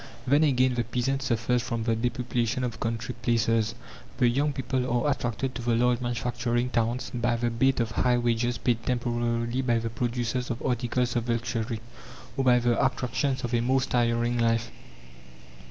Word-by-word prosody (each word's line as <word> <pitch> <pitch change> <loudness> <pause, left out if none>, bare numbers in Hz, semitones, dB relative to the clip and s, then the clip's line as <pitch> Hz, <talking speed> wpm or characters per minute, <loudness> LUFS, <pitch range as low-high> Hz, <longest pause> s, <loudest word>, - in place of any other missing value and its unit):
Then 145 +4 +4
again 130 -3 +3
the 120 -1 0
peasant 125 +3 -1
suffers 120 -2 +1
from 115 -1 -3
the 115 0 +1
depopulation 120 +1 -1
of 120 -3 -3
country 115 +1 -3
places: 115 -1 +1 0.4
the 125 - +4
young 140 +5 +1
people 130 -1 -2 0.2
are 145 - +3
attracted 125 0 -2
to 125 - -5
the 120 0 +1
large 125 +1 +2
manufacturing 120 0 -1
towns 115 0 -1
by 120 -1 +1
the 120 0 -1
bait 130 +3 +2
of 115 -2 0
high 125 +1 +2
wages 120 0 0
paid 115 0 0
temporarily 120 0 -1
by 120 -3 +2
the 115 0 -3
producers 120 +1 -2
of 120 - -3
articles 125 0 0
of 120 0 -1
luxury, 115 -1 -2 0.5
or 135 - 0
by 125 -1 +5
the 120 -1 +2
attractions 130 0 0
of 120 0 -3
a 120 - +3
more 130 +3 +2
stirring 120 -2 +1
life. 115 0 +1
120 Hz, 170 wpm, -27 LUFS, 115-125 Hz, 0.5 s, by